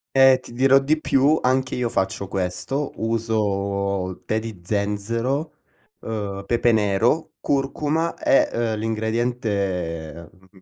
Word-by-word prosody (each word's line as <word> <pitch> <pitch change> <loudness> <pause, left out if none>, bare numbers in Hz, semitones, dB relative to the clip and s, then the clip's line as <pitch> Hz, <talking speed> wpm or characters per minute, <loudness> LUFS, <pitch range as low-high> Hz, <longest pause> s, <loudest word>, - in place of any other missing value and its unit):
E 135 -1 +7
ti - - -12
dirò 130 +3 +5
di 155 +3 +1
più, 145 +2 +3
anch'io 130 -1 +1
faccio 95 -2 -2
questo, 95 +10 -2
uso 100 -4 -1
tè 110 - 0
di 110 -5 -7
zenzero, 115 - -1 0.5
uhm 100 -3 -4
pepe 120 +1 +2
nero, 110 +10 +1
curcuma 145 +4 0
e, - - +3 0.2
uhm - - -2
l'ingrediente, 105 -8 -2
mhmm, 95 0 -23
110 Hz, 115 wpm, -23 LUFS, 100-130 Hz, 0.5 s, E